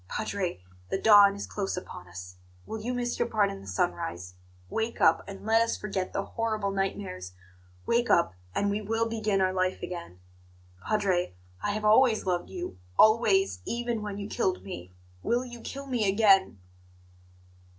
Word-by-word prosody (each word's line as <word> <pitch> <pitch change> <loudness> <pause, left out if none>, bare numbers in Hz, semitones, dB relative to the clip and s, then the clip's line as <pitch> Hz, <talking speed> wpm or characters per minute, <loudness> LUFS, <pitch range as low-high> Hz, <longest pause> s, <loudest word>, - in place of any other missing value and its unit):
Padre, 190 - -3 0.3
the - - 0
dawn 205 -2 +7
is 200 - -5
close 195 -3 -3
upon 90 - -8
us 90 +1 -10 0.3
will 220 - -5
you 240 +3 -2
miss 245 -1 -2
your - - +2
part 210 -3 +2
in 95 - -8
the 100 - -13
sunrise? 90 -1 -2 0.3
Wake 225 - -2
up, - - +4
and 195 0 -9
let 225 +1 +4
us 230 - 0
forget 195 -3 -3
the 195 - -2
horrible 215 -3 -2
nightmares, 195 - -3 0.5
wake 240 +1 +1
up, 170 - +4 0.2
and 200 0 +1
we 205 +1 -1
will 225 +2 0
begin 215 -3 0
our 185 0 +2
life 185 0 -1
again! 170 - -7 0.7
Padre, 190 - +1 0.3
I 205 - -1
have 215 0 -3
always 220 +1 +5
loved 180 -2 -1
you 175 - -6 0.2
always, 200 - +4
even 235 - -2
when 205 -1 -5
you 200 0 -5
killed 185 - -1
me 90 -2 -8 0.3
will 245 - 0
you 240 -1 -10
kill 275 +3 -6
me 240 -7 0
again?" 195 - +4
200 Hz, 170 wpm, -28 LUFS, 180-220 Hz, 0.7 s, dawn